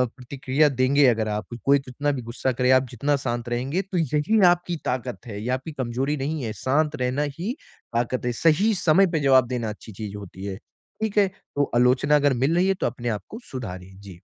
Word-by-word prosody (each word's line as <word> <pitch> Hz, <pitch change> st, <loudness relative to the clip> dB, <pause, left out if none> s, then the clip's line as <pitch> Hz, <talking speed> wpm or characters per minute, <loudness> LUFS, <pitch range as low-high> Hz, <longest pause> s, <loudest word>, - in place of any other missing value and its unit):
प्रतिक्रिया 135 Hz, +3 st, +1 dB
देंगे 135 Hz, +2 st, +3 dB
अगर 110 Hz, -3 st, +2 dB
आप 105 Hz, +1 st, -3 dB, 0.2 s
कोई 140 Hz, +1 st, +5 dB
कितना 135 Hz, +2 st, -2 dB
भी 135 Hz, -3 st, -3 dB
गुस्सा 120 Hz, +3 st, -2 dB
करे, 125 Hz, +1 st, +2 dB
आप 130 Hz, 0 st, +4 dB
जितना 140 Hz, +5 st, 0 dB
शांत 120 Hz, -1 st, -2 dB
रहेंगे। 130 Hz, +9 st, -1 dB
तो 195 Hz, -1 st, -5 dB
यही 155 Hz, -, +1 dB
ना, 190 Hz, -4 st, +7 dB
आपकी 175 Hz, 0 st, 0 dB
ताक़त 125 Hz, 0 st, -3 dB
है। 105 Hz, -2 st, -6 dB
ये 115 Hz, -, -4 dB
आपकी 135 Hz, +5 st, -8 dB
कमज़ोरी 135 Hz, +1 st, -2 dB
नहीं 145 Hz, +1 st, -3 dB
है, 110 Hz, -2 st, -3 dB
शांत 150 Hz, +3 st, +1 dB
रहना 125 Hz, +3 st, 0 dB, 0.2 s
ही 215 Hz, +9 st, -2 dB, 0.4 s
ताक़त 120 Hz, +1 st, -1 dB
है। 125 Hz, -, +1 dB
सही 165 Hz, +8 st, +4 dB
समय 175 Hz, +4 st, +5 dB
पे -, -, +2 dB
जवाब 130 Hz, -3 st, +4 dB
देना 120 Hz, -3 st, -2 dB
अच्छी 105 Hz, +1 st, -9 dB
चीज़ 105 Hz, 0 st, -7 dB
होती 95 Hz, -1 st, -9 dB
है। 95 Hz, -1 st, -4 dB, 0.4 s
ठीक 220 Hz, -1 st, -2 dB
है? 200 Hz, -1 st, +5 dB
तो 145 Hz, -7 st, -4 dB
आलोचना 130 Hz, +4 st, +4 dB
अगर 145 Hz, -1 st, +3 dB
मिल 155 Hz, +5 st, +2 dB
रही 180 Hz, +2 st, +3 dB
है, 195 Hz, -, +3 dB
तो 190 Hz, -, -1 dB
अपने 120 Hz, 0 st, -4 dB
आपको 115 Hz, -, -5 dB
सुधारिए। 95 Hz, -7 st, -7 dB
जी। 95 Hz, -4 st, -12 dB
130 Hz, 215 wpm, -24 LUFS, 120-150 Hz, 0.4 s, ना